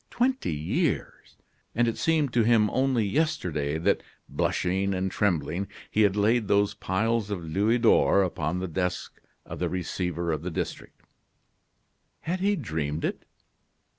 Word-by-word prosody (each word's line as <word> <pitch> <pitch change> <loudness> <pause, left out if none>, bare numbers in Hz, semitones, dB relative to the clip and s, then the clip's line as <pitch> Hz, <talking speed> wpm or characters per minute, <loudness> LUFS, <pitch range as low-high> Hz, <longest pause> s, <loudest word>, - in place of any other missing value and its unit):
Twenty 255 - 0
years! 75 +2 -2 0.4
And 120 0 +3
it 115 - 0
seemed 155 -6 +1
to 120 - +4
him 110 -2 +4
only 130 -4 +1
yesterday 90 - 0
that, 80 - +1 0.3
blushing 95 +2 0
and 95 0 -1
trembling, 90 -1 0 0.2
he 110 - +2
had 100 -2 +4
laid 110 +2 +2
those 100 0 +2
piles 110 +3 -1
of 95 -5 -3
louis 100 +9 +2
d'or 115 -4 +4
upon 85 -2 -2
the 95 +1 -3
desk 90 +1 -3 0.2
of - - -8
the - - 0
receiver 90 -1 -2
of 75 -2 -2
the 90 - -4
district. 80 - -5 1.2
Had 180 +3 -2
he 200 +2 +2
dreamed 80 - -3
it? - - -4
100 Hz, 145 wpm, -27 LUFS, 85-115 Hz, 1.2 s, to